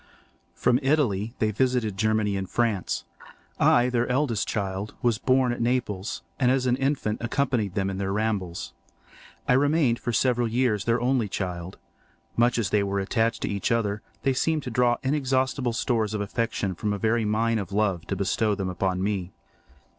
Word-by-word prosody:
From 125 0 +2
Italy 125 -6 +1
they 110 -1 +1
visited 125 -2 0
Germany 110 0 +1
and 95 -1 -3
France. 115 -6 0 0.6
I, 120 +1 +5
their 120 -1 +1
eldest 125 -5 0
child, 100 0 -3
was 120 -3 +2
born 130 -1 +3
at 120 - -5
Naples, 115 -5 -1 0.2
and 125 -2 +3
as 130 0 +2
an 125 -1 +3
infant 135 -6 -1
accompanied 120 -5 0
them 95 -1 0
in 95 0 -3
their 95 -1 -1
rambles. 100 -5 -2 0.7
I - - +4
remained 145 -2 +3
for 120 - -2
several 120 0 +2
years 115 -4 +1
their 115 +1 +2
only 125 -3 +1
child. 90 -2 -4 0.6
Much 120 +1 +3
as 110 -5 -1
they 105 - +3
were 100 0 -1
attached 110 +3 0
to - - 0
each 100 +4 -1
other, 105 -3 0 0.2
they 135 - +2
seemed 155 +3 0
to 125 - -5
draw 120 +1 +3
inexhaustible 130 -2 0
stores 115 -3 0
of 105 - -1
affection 100 -2 -2
from 105 +3 -2
a - - -2
very 110 +2 +1
mine 110 +2 +1
of 100 -1 -5
love 100 -4 0
to - - -1
bestow 110 -2 +1
them 95 -2 -3
upon 95 0 -1
me. 100 -3 -2
115 Hz, 175 wpm, -26 LUFS, 100-125 Hz, 0.7 s, I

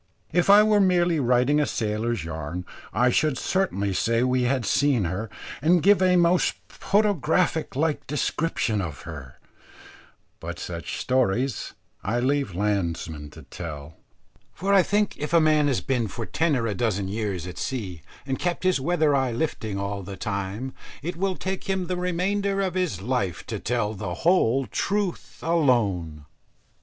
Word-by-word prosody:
If 175 +3 +2
I 205 +1 +9
were 215 -1 +4
merely 175 -3 +3
writing 125 +3 +3
a 150 - +2
sailor's 110 -2 -1
yarn, 80 +2 -5 0.3
I 125 0 +3
should 150 +1 +2
certainly 100 - 0
say 115 +5 +1
we 125 0 +2
had 130 -2 0
seen 135 0 +2
her, 95 +6 -3 0.3
and 170 +3 +4
give 200 0 +5
a 185 -1 +4
most 175 0 +3
photographic 180 -6 +1
like 150 +2 0
description 145 -7 0
of 80 -5 -5
her; 70 -7 -9 1.0
but - - -6
such - - -5
stories 125 0 0 0.3
I 115 +5 0
leave 135 -6 0
landsmen 85 -7 -2
to 80 +1 -13
tell, 75 +1 -8 0.6
for 195 +3 0
I 195 - +7
think 205 +2 0
if 150 +2 -4
a 170 - +7
man 155 -2 +4
has 135 -4 +1
been 125 -4 0
for 115 +3 -5
ten 160 +3 +1
or 115 -3 0
a 110 - 0
dozen 100 -2 -1
years 100 -4 -3
at 90 - -7
sea, 95 -11 -4 0.2
and 135 -1 -2
kept 175 0 -1
his 185 -7 +2
weather 155 -1 +2
eye 130 -2 +1
lifting 115 -5 -2
all 100 0 -3
the 95 +1 -8
time, 100 +6 -3 0.3
it 175 +3 -3
will 190 +2 -1
take 190 +1 -4
him 190 -2 -1
the 180 - -2
remainder 195 +3 0
of 190 -3 0
his 180 - -1
life 110 -7 -1
to - - -4
tell 115 -3 -1
the 100 -4 -4
whole 135 -7 +3
truth 200 - -2
alone. 105 - +1
130 Hz, 165 wpm, -25 LUFS, -, 1.0 s, I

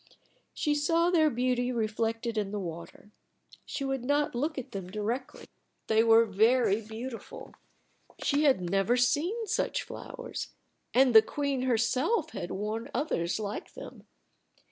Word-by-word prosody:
She 300 - +1
saw 330 +4 +2
their 315 -3 +4
beauty 250 -1 0
reflected 225 0 -1
in 210 -2 -1
the 210 +1 -3
water. 170 +3 -8 0.6
She 275 - -4
would 270 -2 -2
not 290 +3 +1
look 295 +6 -2
at 260 - -6
them 190 -2 -6
directly. 215 +6 -4 0.4
They 220 0 +3
were 230 0 +6
very 220 +1 +3
beautiful. 225 +3 -8 0.7
She 290 +1 +2
had 265 -9 +4
never 195 +7 +1
seen 315 - +1
such 450 +3 -1
flowers. - - -7 0.4
And 255 -1 +4
the 220 - +10
queen 280 +1 -2
herself 260 - +1
had 175 - -5
worn 215 +4 -4
others 220 - -1
like 210 -1 -5
them. - - -11
240 Hz, 140 wpm, -29 LUFS, 215-285 Hz, 0.7 s, the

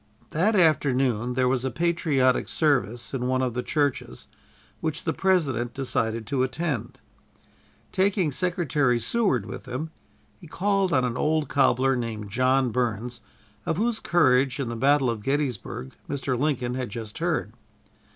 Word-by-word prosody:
That 200 +8 +2
afternoon 130 - +2
there 130 -1 +2
was 130 -1 +1
a 130 - 0
patriotic 150 -6 +1
service 120 - 0
in 125 -2 -1
one 130 0 +1
of 125 -2 -1
the 125 - -2
churches 145 -1 -2 0.5
which 160 -1 -3
the 160 - -1
President 135 -11 0
decided 115 -4 -1
to 135 +1 -1
attend. 130 -2 -2 0.9
Taking 190 -4 +1
Secretary 150 -7 +1
Seward 130 - +1
with - - -8
him, 135 +6 -4 0.5
he - - -13
called 195 +2 0
on 130 -5 +3
an 125 0 -2
old 155 +1 +1
cobbler 135 -1 +3
named 110 -4 -4
John 130 +2 +2
Burns, 120 0 -2 0.4
of 160 - -1
whose 225 +2 0
courage 135 -5 +3
in 130 -4 -2
the 115 - -4
battle 135 +3 +3
of 115 -3 -2
Gettysburg 125 - -2 0.2
Mr. 135 -2 -1
Lincoln 130 -2 -1
had 125 -1 -3
just 110 0 -7
heard. 160 -10 -1
130 Hz, 150 wpm, -25 LUFS, 120-155 Hz, 0.9 s, on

